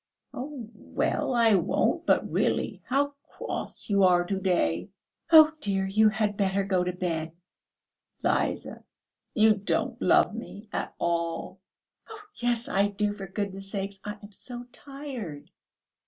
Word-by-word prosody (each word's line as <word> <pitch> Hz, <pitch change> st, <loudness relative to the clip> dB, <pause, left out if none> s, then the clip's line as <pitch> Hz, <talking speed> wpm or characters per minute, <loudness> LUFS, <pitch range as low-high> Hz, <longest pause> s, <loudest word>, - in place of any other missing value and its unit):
"Oh, 265 Hz, -3 st, -6 dB
well, 255 Hz, -, -1 dB
I 230 Hz, -2 st, +5 dB
won't; 185 Hz, -4 st, +1 dB
but -, -, +3 dB
really, -, -, 0 dB
how 285 Hz, +2 st, +1 dB, 0.2 s
cross -, -, -4 dB
you 200 Hz, -1 st, +2 dB
are 175 Hz, -1 st, +5 dB
to 195 Hz, -, -1 dB
day!..." 90 Hz, -, +1 dB, 0.4 s
"Oh, 315 Hz, -1 st, +9 dB
dear, 195 Hz, -6 st, 0 dB
you 215 Hz, +3 st, +4 dB
had 210 Hz, -1 st, -1 dB
better 195 Hz, 0 st, +1 dB
go 190 Hz, -2 st, +1 dB
to 180 Hz, -, -1 dB
bed." 165 Hz, -3 st, -3 dB, 0.9 s
"Liza, -, -, -1 dB, 0.5 s
you 220 Hz, -2 st, +6 dB
don't 205 Hz, -1 st, -1 dB
love -, -, +4 dB
me 210 Hz, +2 st, -8 dB
at -, -, -3 dB
all." 170 Hz, +2 st, -2 dB, 0.5 s
"Oh, 440 Hz, -1 st, -9 dB, 0.2 s
yes, 240 Hz, -1 st, 0 dB
I 200 Hz, +1 st, +2 dB
do! 205 Hz, 0 st, -1 dB
For 195 Hz, -1 st, -7 dB
goodness' 195 Hz, 0 st, -4 dB
sake, 200 Hz, 0 st, -3 dB
I 210 Hz, 0 st, -5 dB
am 205 Hz, -, -11 dB
so 240 Hz, +4 st, -8 dB
tired." 260 Hz, -, -8 dB
200 Hz, 140 wpm, -27 LUFS, 185-230 Hz, 0.9 s, Oh